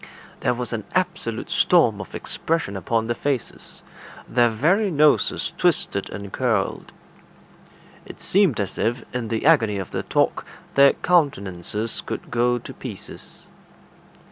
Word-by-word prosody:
There 125 - +1
was 120 -1 -4
an 110 -2 -3
absolute 180 -11 -1
storm - - +3
of - - -10
expression 160 -11 -2
upon 110 +5 -1
their 120 - 0
faces; 135 -1 -4 0.4
their 120 -1 +3
very 170 - +2
noses 150 -3 +2
twisted - - +1
and 100 -1 -8
curled. 110 -6 -1 1.2
It - - -11
seemed 185 - +2
as 100 -2 -3
if, 120 +4 0
in 125 -2 -3
the 115 +2 -2
agony 115 -10 +4
of 95 - -5
their - - -2
talk, - - 0 0.3
their 140 0 +6
countenances 105 - 0
would - - -5
go 120 +1 +2
to 120 - -9
pieces. - - -10
120 Hz, 135 wpm, -23 LUFS, 110-145 Hz, 1.2 s, their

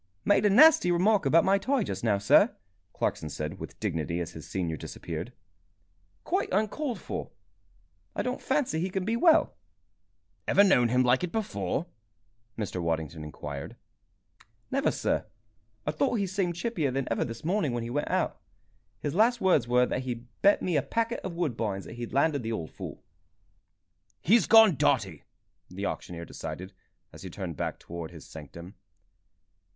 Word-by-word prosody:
"Made 205 +1 +4
a - - +4
nasty 305 - +7
remark 190 0 +3
about 165 +5 +5
my 195 +1 +4
tie 260 +3 +1
just 95 - -5
now, 105 -4 +3
sir," 100 0 +4 0.4
Clarkson 80 - -2
said, 75 +5 -5
with - - -9
dignity, 85 -4 -2
as 85 - -4
his 80 - -10
senior 85 -4 -2
disappeared. 85 - -6 0.9
"Quite - - -1
uncalled 220 +4 -1
for. - - -5 0.9
I - - -1
don't 250 +1 -3
fancy 265 - 0
he 180 +3 -1
can 190 0 -2
be 225 +2 0
well." 315 +6 +4 0.9
"Ever 200 - +6
known 125 -12 +4
him 125 +2 +3
like 125 +4 +3
it 180 - -2
before?" 145 - -2 0.7
Mr. 100 -5 -3
Waddington 80 -1 -2
inquired. 75 -2 -7 1.0
"Never, - - +2
sir. - - -1 0.6
I 150 - 0
thought 155 +9 0
he 200 -3 0
seemed 185 -2 -1
chippier 175 - -1
than 135 0 -2
ever - - +1
this 115 +3 -7
morning 175 -5 +1
when 120 -1 -2
he 115 - -5
went 145 +3 -1
out. - - -1 0.6
His 145 - -2
last 230 +5 +3
words 170 - +3
were 125 +1 +4
that 130 - -2
he'd 125 -2 -5 0.2
bet 200 - +4
me 175 -4 +1
a - - +3
packet 230 - -1
of 180 -3 -5
Woodbines 115 - -2
that - - -9
he 120 0 -5
landed 140 +2 +1
the 115 0 -4
old 85 -8 -4
fool." - - -8 1.2
"He's 225 +6 +4
gone 220 -7 +7
dotty!" - - +1 0.4
the 100 +3 -5
auctioneer 85 -4 -5
decided, 85 +5 -7 0.4
as - - -12
he 95 - -7
turned 90 -2 -6
back - - -3
towards 85 -1 -7
his 80 -4 -12
sanctum. 85 +4 -10
130 Hz, 165 wpm, -28 LUFS, -, 1.2 s, nasty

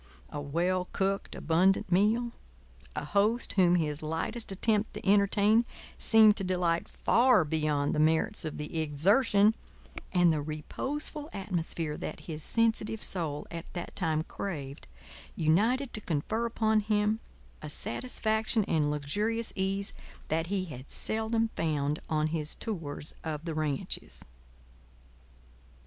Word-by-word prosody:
A 145 - -4
well 175 +6 0
cooked, 195 0 -1
abundant 185 +4 +2
meal, 220 +6 +3 0.6
a - - -3
host 210 +9 +1
whom 180 -2 +4
his 150 -3 -1
lightest 165 +9 -3
attempt 210 +2 0
to - - -7
entertain 205 +3 +4 0.4
seemed 220 -2 +6
to 195 - 0
delight 180 -2 0
far 240 -7 +4
beyond 150 -2 0
the - - 0
merits 160 +8 +2
of 155 -2 -4
the 150 +2 -4
exertion, 200 - +4 0.6
and 175 -2 +4
the 150 - -1
reposeful 280 - -3
atmosphere 170 -6 -2
that - - -6
his 155 -2 -5
sensitive 225 +1 +1
soul 155 -5 +3
at 165 0 -7
that 175 -1 -6
time 160 -3 0
craved 145 -7 -6 0.5
united 225 - +2
to 215 - -3
confer 200 +8 -1
upon 220 -1 +2
him 210 +1 +1 0.4
a 150 - -6
satisfaction 220 - 0
and 155 -5 +1
luxurious 210 +11 -1
ease 195 +1 -1 0.4
that 160 +1 0
he 190 0 -1
had 130 -5 -10
seldom 225 +1 0
found 150 -2 0
on 155 -1 +1
his 155 -1 -2
tours 165 -9 -3
of 155 0 -4
the 165 - -3
ranches. 150 -3 -2
185 Hz, 130 wpm, -30 LUFS, 155-215 Hz, 0.6 s, seemed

